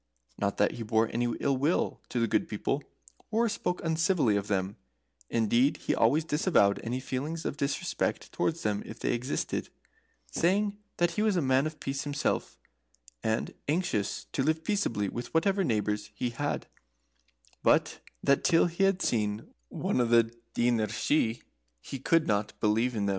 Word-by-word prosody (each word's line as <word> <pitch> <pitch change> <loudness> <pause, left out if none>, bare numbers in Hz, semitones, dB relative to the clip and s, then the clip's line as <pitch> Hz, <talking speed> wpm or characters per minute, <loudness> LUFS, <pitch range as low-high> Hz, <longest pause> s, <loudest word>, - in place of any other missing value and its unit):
] - - -39
Not 100 -1 0
that - - +3
he 120 - -7
bore 110 0 +1
any 120 +1 +1
ill 140 -1 +2
will 150 +7 0
to 125 - -1
the 115 - +3
Good - - +1
People, - - -1 0.5
or 230 +2 +2
spoke 180 -4 -2
uncivilly 165 - +2
of 100 0 -1
them; 100 -1 -1 0.5
indeed 120 +5 +2
he - - -1
always 145 +8 +3
disavowed 150 - +3
any 120 +3 -2
feeling 135 +5 -3
of - - -2
disrespect 140 -1 -2
towards 165 0 -1
them 105 -1 0
if - - -9
they - - 0
existed, 125 +4 -2 0.6
saying 200 +4 +2 0.2
that 175 0 +2
he 190 - -1
was 215 -2 +2
a 175 - +2
man 130 +2 +3
of 155 0 -8
peace 135 0 -3
himself, 145 0 -1 0.6
and 110 0 -1
anxious 150 - -1
to - - -1
live 160 +3 +1
peaceably 140 - 0
with 120 +4 -5
whatever 195 +4 +3
neighbours 105 - -1
he 120 +3 -2
had, 145 +5 -2 1.0
but - - +3 0.2
that 140 - +3
till 165 -2 +5
he 175 +3 +1
had 195 -1 +2
seen 105 -2 -1 0.2
one - - -1
of 120 - +1
the 115 0 +4 0.2
Daoiné 120 -3 +2
Shi 115 +1 0 0.4
he 135 - -7
could 165 +4 +3
not 105 0 -1
believe 115 +4 +2
in 105 -2 0
them. - - +1
130 Hz, 170 wpm, -29 LUFS, 110-165 Hz, 1.0 s, till